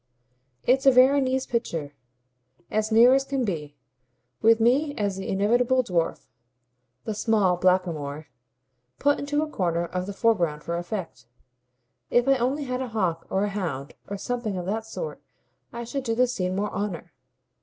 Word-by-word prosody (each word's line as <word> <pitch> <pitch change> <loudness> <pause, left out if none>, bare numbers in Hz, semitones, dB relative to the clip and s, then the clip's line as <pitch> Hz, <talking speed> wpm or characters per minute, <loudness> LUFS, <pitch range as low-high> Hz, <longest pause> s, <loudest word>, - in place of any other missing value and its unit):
It's 265 +2 +3
a - - +10
Veronese 260 0 +4
picture, 165 - -3 0.8
as 215 +1 0
near 235 +3 +7
as 270 0 +3
can 270 -2 -1
be 150 -7 -4 0.7
with 225 +1 +5
me 275 +6 +2
as 205 -2 -1
the 190 - -5
inevitable 240 +6 +2
dwarf, 175 -7 -1 0.8
the 220 - -3
small 210 -4 +2
blackamoor, 170 -5 0 0.7
put 285 0 +2
into 290 +1 0
a - - -3
corner 175 - -1
of 180 +2 -4
the 200 - -4
foreground 170 -9 +1
for 170 - -3
effect. 175 - -5 0.8
If 245 +1 +3
I 275 0 +5
only 260 +5 0
had 255 -1 -3
a 260 - -3
hawk 185 -8 -2
or 195 - +1
a 205 - 0
hound 165 -9 -4
or 200 - -4
something 220 -1 -3
of 180 - -4
that 220 +3 -3
sort 475 - -6 0.5
I 235 0 -6
should 270 +3 -4
do 230 -3 -1
the 250 +2 +4
scene 185 -7 -2
more 205 +2 -1
honour. 180 -5 -4
215 Hz, 165 wpm, -25 LUFS, 180-250 Hz, 0.8 s, a